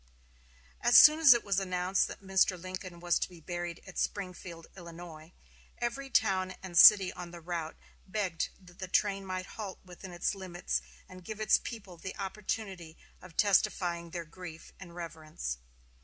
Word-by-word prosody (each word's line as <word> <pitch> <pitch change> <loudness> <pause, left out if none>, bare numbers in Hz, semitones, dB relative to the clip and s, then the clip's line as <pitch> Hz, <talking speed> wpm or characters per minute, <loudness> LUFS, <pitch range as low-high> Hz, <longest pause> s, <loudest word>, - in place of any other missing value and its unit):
As 240 - +6
soon 305 +1 +9
as 310 -4 +8
it 235 - -1
was 200 -1 +1
announced 185 0 0
that - - -10
Mr. 190 -1 +2
Lincoln 185 -1 -7
was 175 0 +1
to - - -2
be 175 -2 -14
buried 175 +1 -5
at 195 - -7
Springfield, 180 -4 -4
Illinois, 170 -2 -11 0.5
every 255 +3 -3
town 185 -6 +1
and 185 -2 -8
city 195 +1 +9
on 180 -1 -8
the 170 0 -10
route 165 -1 -5 0.3
begged 190 -4 -2
that 180 -2 -18
the 190 - -5
train 195 +1 +1
might 185 -1 -4
halt 200 -1 -7
within 180 +1 -11
its 175 +3 -1
limits 185 -3 -3 0.3
and 185 0 -12
give 215 +3 -7
its 215 -2 +4
people 200 -7 -8
the 185 +3 -7
opportunity 195 -4 -5 0.2
of 180 -3 -14
testifying 175 -4 +2
their 170 0 -5
grief 165 0 -11
and 175 -3 -11
reverence. 155 - -6
185 Hz, 165 wpm, -31 LUFS, 170-195 Hz, 0.5 s, soon